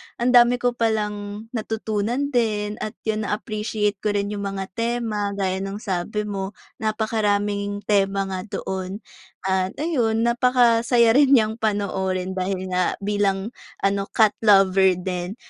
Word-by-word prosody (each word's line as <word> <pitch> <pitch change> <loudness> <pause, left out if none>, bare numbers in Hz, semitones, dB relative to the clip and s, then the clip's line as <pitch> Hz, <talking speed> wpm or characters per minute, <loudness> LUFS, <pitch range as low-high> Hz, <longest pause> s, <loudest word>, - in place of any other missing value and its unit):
ang 240 +1 +1
dami 245 0 +6
ko 245 0 0
palang 210 -3 -2
natutunan 225 +4 -2
din 215 -4 0
at 215 +2 -5
yun 215 -1 -1
na-appreciate 210 -1 -2
ko 210 -1 -1
rin 200 0 -1
yung 200 -1 -3
mga 195 -1 -5
tema, 225 -2 -2
gaya 190 -1 -1
ng 195 +3 -5
sabi 200 +2 -2
mo, 195 -1 -4 0.2
napakaraming 205 -2 -1
tema 195 -1 +1
nga 190 +1 -5
doon 190 +1 -5 0.4
at 190 0 0
ayun, 235 -9 +1
napakasaya 235 -1 +4
rin 275 +1 +5
niyang 220 -1 +1
panoorin 190 -3 -1
dahil 190 0 -3
nga 180 0 +1
bilang 200 0 0 0.3
ano, 195 0 +1
cat 220 -2 +4
lover 195 -3 +5
din. 180 +2 -4
210 Hz, 135 wpm, -23 LUFS, 195-225 Hz, 0.4 s, dami